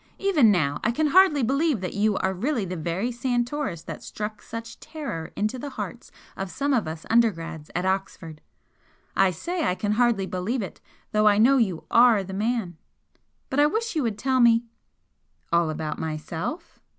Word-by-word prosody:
Even 340 - +4
now 145 -7 +1
I - - +2
can 310 +7 +1
hardly 335 -5 +5
believe 275 +1 +1
that 185 - -4
you 205 0 +1
are 190 0 0
really 230 +3 -1
the 185 0 -4
very 175 +8 -2
Santoris 240 - -2
that - - -7
struck 215 0 -6
such 230 0 -8
terror 265 - -6
into 215 +5 -1
the 285 - -5
hearts - - -7 0.2
of 195 -1 -4
some 280 +7 -1
of 235 -10 +1
us 160 0 -6
undergrads 165 -9 +1
at 180 +2 0
Oxford! 190 -5 -3 0.7
I 195 -1 +4
say 340 - -3
I 180 - +1
can 205 +2 -2
hardly 225 -3 +2
believe 195 +6 -2
it, 190 - -9 0.3
though 215 0 +3
I 205 -1 +5
know 255 +6 +5
you 190 -9 0
ARE 235 -4 +6
the 190 0 -8
man. 210 -4 -1 0.7
But 265 - +1
I 295 - +6
wish 445 +5 -2
you 310 - +1
would 225 -5 -1
tell 260 +3 +1
me 235 -1 +5 0.4
" - - -20
"All 170 -1 +3
about 155 0 -4
myself?" 160 - -5
215 Hz, 185 wpm, -25 LUFS, 180-260 Hz, 0.7 s, ARE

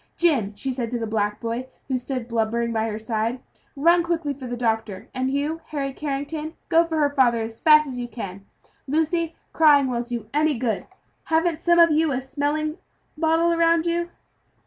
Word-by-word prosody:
"Jim," 275 - +2
she 260 +5 -3
said 245 -3 -3
to 240 - -2
the 230 - -3
black 210 -1 -1
boy, 235 +2 -3 0.2
who 265 - -1
stood 250 -1 -3
blubbering 230 0 0
by 220 0 0
her 215 -1 -3
side, 225 +2 -2 0.4
"run 340 +5 +4
quickly 335 -4 -1
for 265 -2 -8
the 245 0 -4
doctor. 220 -4 -2
And 260 0 -1
you, 290 +4 -1
Harry 275 -3 -3
Carrington, 300 +3 -4
go 335 0 +5
for 320 -1 -2
her 290 -2 +2
father, 250 -5 +3
as 225 0 -7
fast 305 -1 +6
as 255 -2 -5
you 240 - -3
can. 200 -5 -7 0.4
Lucy, 320 +3 0 0.2
crying 295 -3 +6
so 260 - -2
won't 240 0 -2
do 235 -3 -5
any 300 -2 +2
good. 225 -4 -2 0.4
Haven't 325 0 +1
some 345 0 +3
of 335 -1 +7
you 310 0 +2
a 260 - 0
smelling 295 +4 -2 0.4
bottle 325 +2 +2
about 335 0 +3
you?" 340 0 0
275 Hz, 190 wpm, -24 LUFS, 235-320 Hz, 0.4 s, of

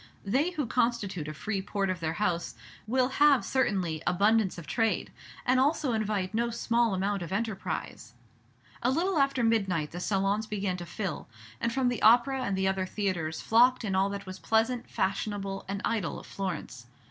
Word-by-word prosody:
They 270 - +2
who 310 -6 -2
constitute 220 -9 0
a 155 - -4
free 195 +7 -2
port 195 0 -1
of 185 - -4
their 160 -1 -2
house 175 -2 -1 0.3
will 255 +2 +2
have 280 0 +4
certainly 185 -11 0
abundance 200 +2 +3
of 170 - -8
trade, 225 +10 0 0.3
and 255 +1 +3
also 285 -1 +2
invite 210 -3 -1
no 235 +2 +1
small 235 -2 +1
amount 195 +1 -1
of 170 0 -6
enterprise. 195 - -4 0.7
A 245 - +2
little 335 +5 +1
after 275 -3 +2
midnight 195 -9 +1
the 175 - -6
salons 200 +3 0
began 195 -3 -2
to 175 -1 -7
fill, 190 0 -4 0.3
and 235 - 0
from 260 +1 +1
the 245 -2 -1
Opera 245 +4 +5
and 195 -1 -1
the 190 0 +1
other 190 -1 0
theatres 180 -6 -2
flocked 245 +2 +4
in 195 - -1
all 190 +1 +2
that 200 0 -5
was 185 0 -8
pleasant, 230 +2 +1
fashionable, 195 0 -2
and 200 +1 -4
idle 210 -7 -1
of - - -13
Florence. 165 -10 -5
205 Hz, 180 wpm, -29 LUFS, 185-235 Hz, 0.7 s, Opera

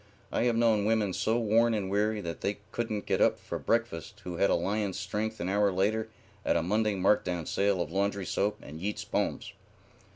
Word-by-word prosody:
I - - +1
have 120 -2 +2
known 115 -3 +3
women 105 -3 +2
so 110 +5 +1
worn 115 0 +3
and 100 -3 -2
weary 105 +2 +1
that 85 -2 -5
they 100 0 -1
couldn't 110 -3 -2
get - - 0
up - - +4
for - - -5
breakfast 110 -3 -1
who 90 -1 -5
had 100 - +3
a - - +4
lion's 100 -1 -1
strength 105 +2 -3
an 85 - -2
hour 100 +1 +3
later 105 +4 0 0.3
at - - +2
a - - 0
Monday 105 +3 +1
marked 95 +2 +3
down 90 -3 -2
sale 100 +2 +1
of 85 -2 -2
laundry 100 +1 0
soap 105 +3 0
and 80 +2 -9
Yeats's 105 +2 -3
poems. - - -2
105 Hz, 205 wpm, -29 LUFS, 95-110 Hz, 0.3 s, up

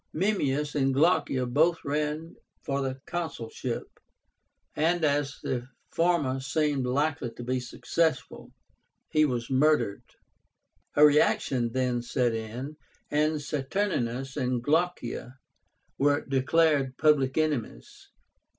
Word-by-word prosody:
Memmius 150 -6 0
and 135 -2 +1
Glaucia 140 -4 +2
both 160 +8 +2
ran 150 +3 -2 0.3
for 140 0 -1
the 135 -1 -3
consulship, 130 -8 -4 0.9
and 165 +1 +2
as 145 -1 0
the 125 -1 -2 0.2
former 165 -6 +1
seemed 140 -1 0
likely 145 0 0
to 115 +1 -10
be 130 +1 -1
successful, 155 +5 -2 0.6
he 155 0 +4
was 125 -3 -2
murdered. 135 -6 +2 0.9
A 150 - +8
reaction 130 -4 +3
then 125 -2 0
set 120 0 0
in, 120 +7 -5 0.3
and 155 +1 +2
Saturnínus 135 - -2
and 125 -1 -1
Glaucia 145 -5 -1 0.6
were 145 +1 +3
declared 140 0 +2
public 145 -3 +3
enemies. 145 - -3
140 Hz, 105 wpm, -28 LUFS, 130-155 Hz, 0.9 s, A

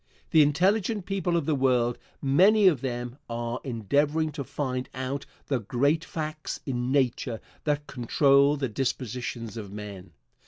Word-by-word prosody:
The 160 - +7
intelligent 190 +7 +2
people 190 -3 0
of 165 - -1
the 155 - +1
world, 125 -3 +2 0.2
many 190 +10 +5
of 155 -9 +3
them, 120 -1 -4
are 120 +1 -3
endeavoring 145 +6 +1
to 145 -1 -5
find 130 -1 -3
out 135 +2 -3 0.2
the 135 -3 0
great 140 +9 +1
facts 155 -3 -5
in 125 -2 -2
Nature 125 -4 +1 0.3
that 150 -1 0
control 140 +3 +3
the 135 -2 -1
dispositions 120 -2 -3
of 105 -3 -7
men. 100 -4 -8
135 Hz, 145 wpm, -27 LUFS, 120-150 Hz, 0.3 s, The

